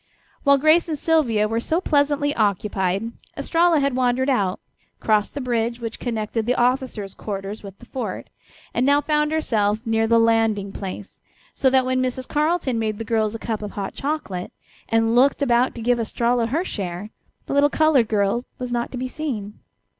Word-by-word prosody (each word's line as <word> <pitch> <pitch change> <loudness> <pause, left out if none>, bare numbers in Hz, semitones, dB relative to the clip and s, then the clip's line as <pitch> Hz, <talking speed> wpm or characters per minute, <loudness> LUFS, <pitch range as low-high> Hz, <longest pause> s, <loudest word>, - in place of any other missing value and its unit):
While 280 -1 +5
Grace 310 +4 +4
and 310 - -1
Sylvia 260 -10 +2
were 225 +1 -1
so 320 +8 0
pleasantly 290 -3 +1
occupied 200 0 0 0.3
Estralla 335 -1 +3
had 280 -2 0
wandered 255 +1 +1
out, 195 -7 0 0.4
crossed 210 +1 +1
the 285 - -3
bridge 235 -1 -1
which 230 -2 -5
connected 225 -1 -2
the 250 - +2
officers' 245 -6 0
quarters 200 0 -5
with 195 -1 -10
the - - -15
fort, 260 - -5 0.4
and 245 - +1
now 285 +2 +4
found 300 0 +1
herself 215 -10 +1
near 225 0 +1
the 230 +1 +4
landing 225 -3 +2
place, 195 0 -7 0.3
so 265 - +2
that 260 0 +3
when 255 0 +1
Mrs. 255 0 -2
Carleton 300 -5 0
made 215 -2 -1
the 225 - -5
girls 220 -1 0
a - - -2
cup 220 -1 -4
of 210 -1 -6
hot 200 -1 -4
chocolate 275 -12 -4 0.4
and 225 0 +2
looked 270 +4 +4
about 245 -1 +2
to 230 - -6
give 245 +1 +2
Estralla 235 +1 0
her 315 +10 -1
share, 195 - -5 0.3
the - - -4
little 285 +1 +4
colored 295 -7 +3
girl 210 +2 +1
was 250 -1 -5
not 240 0 -2
to 255 - -5
be 255 +1 -3
seen. 240 -8 -5
235 Hz, 185 wpm, -22 LUFS, 215-280 Hz, 0.4 s, While